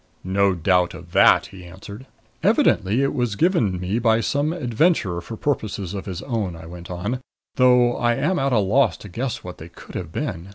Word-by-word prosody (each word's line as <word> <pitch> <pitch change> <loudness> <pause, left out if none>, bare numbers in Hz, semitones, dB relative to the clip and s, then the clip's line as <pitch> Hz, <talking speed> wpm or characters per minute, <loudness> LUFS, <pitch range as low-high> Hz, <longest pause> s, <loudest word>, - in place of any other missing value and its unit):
"No 95 +1 +1
doubt 90 +1 +1
of 85 +1 -12
that," - - +5
he 95 -2 -11
answered. 100 +7 -11 0.3
"Evidently 105 +8 +2
it 140 - 0
was 120 -5 -1
given 115 - +1
me 95 +5 -1
by 115 -1 +3
some 145 +6 0
adventurer 125 - 0
for 110 +6 -8
purposes 105 -9 -2
of 100 0 -6
his 95 0 -5
own," 110 -9 -3
I 80 0 -11
went 85 +1 -10
on; 100 +9 -3 0.3
"though 125 -1 +4
I 120 0 +1
am 180 +8 0
at 135 0 0
a 120 - +3
loss 105 0 +2
to 105 - -11
guess 120 +6 -4
what 90 -1 -9
they 80 - -10
could 85 - -14
have - - -5
been." 85 +4 -4
105 Hz, 200 wpm, -22 LUFS, 90-125 Hz, 0.3 s, that